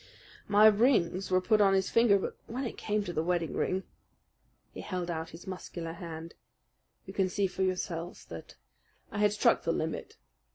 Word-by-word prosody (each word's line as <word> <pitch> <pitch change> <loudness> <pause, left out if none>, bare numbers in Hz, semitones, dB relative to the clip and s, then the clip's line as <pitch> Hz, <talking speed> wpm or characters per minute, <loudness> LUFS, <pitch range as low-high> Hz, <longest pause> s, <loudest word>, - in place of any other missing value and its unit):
"My 205 +1 +6
rings 210 -4 +4
were 185 0 +3
put 215 +3 +3
on 195 -1 +5
his 190 0 0
finger; 230 -3 +5
but 195 - -4
when 250 +4 -4
it 235 - -4
came 210 0 -1
to 175 - -5
the 155 - 0
wedding 170 -1 -1
ring," 190 +1 -1 0.9
he - - -8
held 180 -2 -3
out 160 0 -4
his 170 0 -12
muscular 175 -3 -6
hand, 165 -1 -8 0.7
"you 190 - -9
can 190 -2 +1
see 200 +2 0
for 190 - -4
yourselves 180 -2 -2
that - - -10 0.6
I - - -4
had 210 -1 +4
struck 210 - +3
the 165 - 0
limit. 160 -1 -3
185 Hz, 180 wpm, -30 LUFS, 170-205 Hz, 0.9 s, My